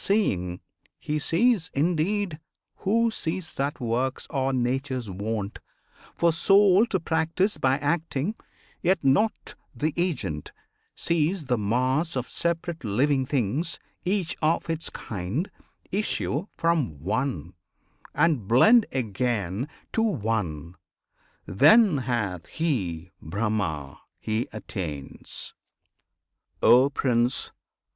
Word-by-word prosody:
Seeing, 90 - 0 0.4
he 150 0 -2
sees, 180 +3 +2
indeed, 170 +3 0 0.4
who 230 +3 +2
sees 165 -3 -3
that 140 +2 -2
works 125 +2 -1
Are 135 0 0
Nature's 130 -2 -1
wont, 105 +2 -3 0.6
for 170 -1 +3
Soul 195 +4 +5
to 190 - 0
practise 165 +5 0
by 135 0 +3
Acting, 155 +3 -1 0.5
yet 180 -1 +2
not 140 +12 +2 0.2
the 155 0 -1
agent; 125 - -2 0.4
sees 165 +1 0
the 125 -2 +1
mass 130 +10 +1
Of 130 -1 -3
separate 170 -1 -2
living 130 +5 +1
things 140 - 0 0.3
each 185 -2 0
of 165 +1 +1
its 165 0 -3
kind 110 - -4 0.4
Issue 195 -4 -1
from 155 - +1
One, 105 - -2 0.6
and 150 - +2
blend 215 - +6
again 115 -2 -1 0.2
to 225 - +1
One: 105 - -1 0.7
Then 210 - +6
hath 105 -9 -2
he 95 - -2
BRAHMA, 85 -6 -2 0.2
he 110 +2 -1
attains! 85 -10 -6 1.1
O 130 +3 +6
Prince! 125 -3 0
135 Hz, 105 wpm, -26 LUFS, 110-170 Hz, 1.1 s, blend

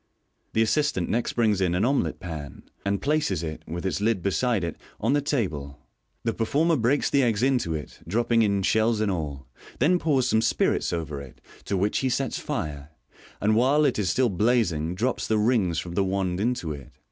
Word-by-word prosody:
The 110 - +3
assistant 115 - +1
next 120 +1 0
brings 110 -5 +2
in 90 -2 +1
an 95 +5 +2
omelet 140 +2 0
pan, 80 -5 -7 0.2
and 100 0 -1
places 150 - +1
it, 80 -1 -5
with 85 +3 -5
its 95 - -1
lid 105 -4 +1
beside 105 +1 +1
it, 85 - -3 0.2
on 115 +5 +1
the 145 - +2
table. 90 - -2 0.5
The 115 - 0
performer 150 +10 +1
breaks 130 +2 +2
the 140 - +4
eggs 115 -3 +1
into 125 -12 +1
it, 75 - -7
dropping 115 +4 +2
in 100 -3 +2
shells 110 +2 +2
and 105 -2 +1
all 75 -6 -4 0.2
— - - -19
then 175 +7 +3
pours 135 -7 +2
some 110 -3 +3
spirits 115 - +1
over 80 -4 -3
it, 70 -3 -12 0.3
to 100 - -1
which 100 +3 +1
he 130 - 0
sets 130 +1 -1
fire, 75 -1 -4 0.5
and 110 +1 +2
while 135 +6 +4
it 130 -6 +1
is 95 -3 +1
still 130 +4 +2
blazing 90 -6 +1
drops 120 +7 -1
the 110 - +2
rings 105 -7 +2
from 85 0 -4
the 100 - +2
wand 95 -1 -1
into 110 -7 -1
it. 70 -4 -8
105 Hz, 200 wpm, -26 LUFS, 85-125 Hz, 0.5 s, the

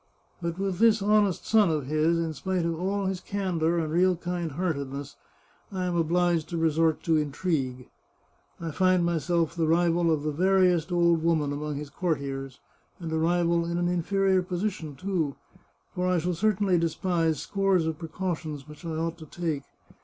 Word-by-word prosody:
But 170 0 -3
with 190 -2 -2
this 220 -3 +4
honest 205 -3 +2
son 215 -4 +4
of 155 -4 -1
his, 155 +4 +2
in 165 -1 -1
spite 185 +3 -2
of 165 -1 -2
all 195 +2 -1
his 190 -1 -2
candour 175 -4 -1
and 160 -2 -1
real 180 +2 +4
kind 175 -2 -4
hearted 145 -5 -2
ness, 140 +1 -7 0.6
I 185 -2 -2
am 180 -1 -1
obliged 170 -1 +1
to 170 - -3
resort 160 0 +2
to 160 -2 +3
intrigue. 140 -4 -2 0.7
I 165 -1 -4
find 185 +2 +3
myself 170 0 0
the 165 -2 +1
rival 170 0 +3
of 150 -2 0
the 155 - -1
veriest 180 0 +2
old 170 -2 +3
woman 155 -4 +1
among 150 0 -3
his 145 0 -6
courtiers, 140 -5 -3 0.4
and 165 -3 -5
a 160 - 0
rival 170 0 +2
in 170 +1 -2
an 175 0 +1
inferior 190 +2 +2
position, 180 -4 -3
too, 165 -3 -2 0.6
for 180 0 -1
I 185 -1 +2
shall 175 +2 0
certainly 195 -1 +2
despise 165 -1 0
scores 195 -4 +1
of 160 -1 -3
precautions 160 -3 -4
which 150 +3 -13
I 165 -2 -4
ought 165 +1 -3
to 155 - -10
take. 155 -4 -3
170 Hz, 175 wpm, -27 LUFS, 155-180 Hz, 0.7 s, this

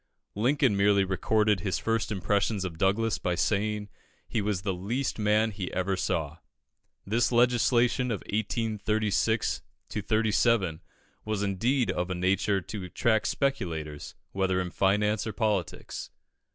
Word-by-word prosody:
Lincoln 125 +1 +2
merely 100 0 +4
recorded 105 +2 +1
his 95 0 -1
first 115 -1 -1
impressions 100 0 0
of 85 -3 -6
Douglas 100 0 +1
by 90 0 -1
saying 105 +2 0 0.4
he 110 - -1
was 100 -3 -1
the 95 -1 0
least 115 +9 -2
man 105 +1 +2
he 95 -3 -5
ever 95 +1 0
saw. 80 -4 -2 0.7
This 115 +5 +1
legislation 120 +1 +3
of 105 - -2
1836 110 0 0 0.3
37 110 -5 +1 0.4
was 110 -2 -2
indeed 115 +3 +1
of 90 0 -2
a 95 - -2
nature 95 +2 +1
to 100 +2 -6
attract 110 +4 +1
speculators, 80 - -2 0.2
whether 95 -1 0
in 90 -1 -3
finance 105 +3 +1
or 110 - -3
politics. 100 -6 -2
105 Hz, 130 wpm, -28 LUFS, 95-110 Hz, 0.7 s, merely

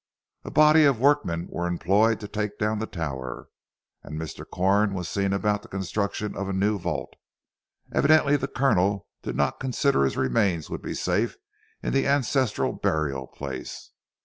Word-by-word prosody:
A - - -6
body 155 +1 +6
of 135 -5 +3
workmen 90 - +2
were 85 0 -2
employed 100 +6 +2
to 105 - -5
take 105 0 -3
down 110 0 0
the 110 - -3
tower; 65 -8 -5 0.5
and 75 +1 -7
Mr. 80 -2 -6
Corn 100 +2 +2
was 90 -3 -3
seen 100 +2 0
about 105 +1 0
the 115 - -14
construction 100 +2 -3
of 100 0 -3
a - - -2
new 100 +2 +1
vault. - - -3 0.8
Evidently 145 -1 +4
the 135 -1 -1
Colonel 100 -8 +1 0.2
did - - -5
not 70 - 0
consider 135 +2 +1
that 70 - +4
his 65 - -1
remains 85 - +1
would - - -4
be - - -5
safe 115 +3 0 0.5
in - - -1
the 135 - +2
ancestral 135 -3 +1
burial 70 -4 -1
place. 65 -2 -7
100 Hz, 170 wpm, -26 LUFS, 85-115 Hz, 0.8 s, body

